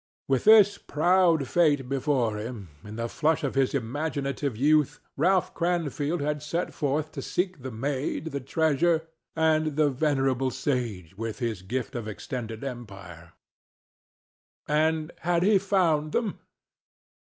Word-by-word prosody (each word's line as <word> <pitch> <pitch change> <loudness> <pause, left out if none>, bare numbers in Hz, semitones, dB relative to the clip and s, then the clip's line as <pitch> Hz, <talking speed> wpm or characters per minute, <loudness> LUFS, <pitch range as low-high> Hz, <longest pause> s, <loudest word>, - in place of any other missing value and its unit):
With 135 -2 +1
this 210 -2 +7
proud 170 -2 +2
fate 145 -6 +2
before 130 -5 0
him, 105 -4 -6
in 105 +1 -9
the 115 +1 -2
flush 155 +5 0
of 140 - -1
his 135 0 +1
imaginative 140 0 -2
youth 150 +2 +3 0.2
Ralph 180 +5 +2
Cranfield 165 -2 -1
had 150 0 -1
set 165 +4 -3
forth 150 +1 -1
to - - -6
seek 180 -4 -2
the 130 - -5
maid, 140 +6 -3
the 140 - -3
treasure, 160 +4 +1 0.3
and 155 -2 +2
the 150 -1 +3
venerable 135 -2 +1
sage 120 - -3
with 115 -1 -4
his 115 -7 -3
gift 125 +7 -4
of 120 -4 -5
extended 115 +1 -6
empire. 95 -10 -9 1.3
And 155 +1 +1
had 175 0 +1
he 200 0 +5
found 170 -6 +1
them? 225 -4 -1
145 Hz, 135 wpm, -27 LUFS, 125-160 Hz, 1.3 s, this